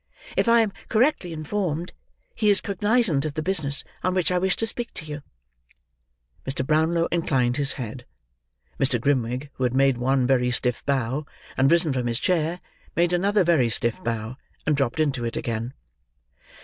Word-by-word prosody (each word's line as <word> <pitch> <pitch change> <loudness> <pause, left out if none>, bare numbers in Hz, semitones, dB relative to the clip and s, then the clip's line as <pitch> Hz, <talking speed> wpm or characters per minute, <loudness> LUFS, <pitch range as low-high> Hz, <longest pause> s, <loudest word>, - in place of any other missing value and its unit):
If - - +1
I 235 0 +6
am 210 -3 -1 0.2
correctly 225 - +2
informed, 165 +1 -3 0.4
he 215 -2 +1
is 205 - +5
cognizant 205 - +1
of 155 -1 -4
the 155 - -2
business 155 -7 0 0.2
on 185 0 0
which 185 -1 +1
I 180 - +2
wish 190 0 +1
to 225 - 0
speak 235 +1 -2
to 165 - -6
you." 150 -1 -6 1.2
Mr. 135 -1 -3
Brownlow 160 +3 +2
inclined 130 -8 +1
his 140 -1 +2
head. 125 0 -7 0.7
Mr. 130 -3 +2
Grimwig, 130 +1 -1
who 130 - -2
had 125 0 +1
made 135 -2 +3
one 130 +1 +2
very 125 -1 +2
stiff 125 -1 0
bow, 135 +1 -1 0.3
and 135 +1 +3
risen 170 -3 +3
from 125 -2 -1
his 115 -1 -1
chair, 170 0 0 0.3
made 175 +1 +2
another 200 +3 +3
very 160 -9 +3
stiff 115 0 0
bow, 115 +2 -3 0.3
and 155 - +2
dropped 135 0 -1
into 140 -5 0
it 115 - -3
again. 115 +1 -3
145 Hz, 175 wpm, -24 LUFS, 125-180 Hz, 1.2 s, I